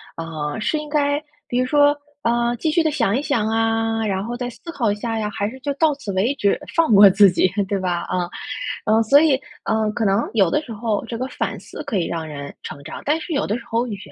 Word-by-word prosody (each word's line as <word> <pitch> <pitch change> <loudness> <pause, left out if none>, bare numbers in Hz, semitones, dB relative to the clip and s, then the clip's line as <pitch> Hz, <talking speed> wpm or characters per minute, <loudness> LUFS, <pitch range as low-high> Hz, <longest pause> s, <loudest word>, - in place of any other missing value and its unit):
啊， 160 0 -4
是 305 +8 0
应 300 0 -5
该 290 -1 +1 0.3
比 245 - -2
如 255 - +2
说 290 +1 +4 0.2
呃 235 -1 +1
继 320 - 0
续 330 +1 +2
地 315 - +1
想 230 -5 +1
一 - - +1
想 220 -7 0
啊， 225 0 +1
然 195 -2 -1
后 240 +2 -4
再 245 0 -3
思 335 - -10
考 235 -10 0
一 - - -1
下 225 +1 -3
呀， 215 - -1
还 200 +1 -2
是 260 +2 -11
就 285 +1 -2
到 300 0 +2
此 255 -8 -6
为 215 +9 +1
止 205 -7 +1 0.2
放 325 -9 +3
过 200 0 +9
自 195 -1 +6
己， 180 0 +2 0.2
对 200 0 -1
吧， 175 -2 -1
啊。 180 -1 -1 0.6
嗯， 220 +1 +4
所 280 +6 +6
以， 310 -4 +4 0.3
呃， 220 -1 +1
可 220 +1 -1
能 200 +3 +2
有 195 -6 +4
的 - - +2
时 255 - -10
候 220 -1 -1
这 230 0 -5
个 255 +2 -3
反 - - -3
思 - - -9
可 205 - -2
以 170 - 0
让 165 -2 -4
人 140 -2 -7
成 140 -2 -8
长， - - -8
但 305 +3 +2
是 330 - -5
有 280 - 0
的 210 - 0
时 - - -11
候 230 +2 0
原 210 -4 -5
225 Hz, 270 characters per minute, -21 LUFS, 200-275 Hz, 0.6 s, 过